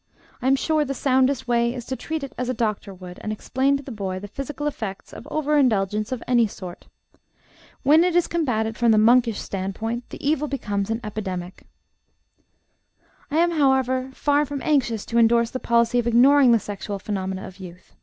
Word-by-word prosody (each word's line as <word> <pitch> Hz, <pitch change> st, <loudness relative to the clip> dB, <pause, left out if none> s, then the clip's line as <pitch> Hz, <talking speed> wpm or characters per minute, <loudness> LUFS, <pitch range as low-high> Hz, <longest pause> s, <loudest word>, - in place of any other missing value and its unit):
I 255 Hz, -, -1 dB
am 270 Hz, -, +5 dB
sure 310 Hz, +3 st, +1 dB
the 275 Hz, -1 st, -4 dB
soundest 260 Hz, -1 st, +1 dB
way 235 Hz, 0 st, +1 dB
is 245 Hz, -2 st, -6 dB
to 260 Hz, -, -3 dB
treat 315 Hz, +2 st, -4 dB
it 275 Hz, -, -7 dB
as 250 Hz, 0 st, -3 dB
a 255 Hz, -, -1 dB
doctor 215 Hz, -3 st, -2 dB
would, 180 Hz, -1 st, -11 dB
and 215 Hz, -, -4 dB
explain 265 Hz, +6 st, 0 dB
to 280 Hz, -, -9 dB
the 270 Hz, -, -8 dB
boy 195 Hz, -4 st, -4 dB
the 200 Hz, +2 st, -7 dB
physical 280 Hz, +6 st, -6 dB
effects 220 Hz, -9 st, -5 dB
of 270 Hz, -, -10 dB
over 300 Hz, -1 st, +1 dB
indulgence 215 Hz, -4 st, +1 dB
of 255 Hz, -2 st, -4 dB
any 240 Hz, -3 st, +4 dB
sort. 180 Hz, -3 st, -10 dB, 1.0 s
When 310 Hz, +4 st, +6 dB
it 355 Hz, -1 st, +1 dB
is 350 Hz, -, +4 dB
combated 225 Hz, -10 st, -1 dB
from 235 Hz, -1 st, +3 dB
the 215 Hz, -, +4 dB
monkish 230 Hz, 0 st, +4 dB
standpoint, 220 Hz, +5 st, -4 dB
the -, -, -6 dB
evil 300 Hz, 0 st, +1 dB
becomes 205 Hz, -8 st, -3 dB
an 225 Hz, +1 st, -2 dB
epidemic." 190 Hz, -4 st, -6 dB, 1.6 s
I 295 Hz, -, -1 dB
am, 345 Hz, +1 st, +3 dB
however, 265 Hz, -4 st, +1 dB
far 290 Hz, 0 st, +2 dB
from 285 Hz, -1 st, -5 dB
anxious 240 Hz, -8 st, +1 dB
to 235 Hz, -, 0 dB
indorse 235 Hz, 0 st, +3 dB
the 255 Hz, -, -4 dB
policy 235 Hz, 0 st, +2 dB
of 240 Hz, -, -1 dB
ignoring 255 Hz, +2 st, +6 dB
the 230 Hz, -, +6 dB
sexual 205 Hz, -1 st, -5 dB
phenomena 190 Hz, -1 st, -4 dB
of 190 Hz, 0 st, -12 dB
youth. 180 Hz, -1 st, -12 dB
240 Hz, 195 wpm, -23 LUFS, 210-275 Hz, 1.6 s, When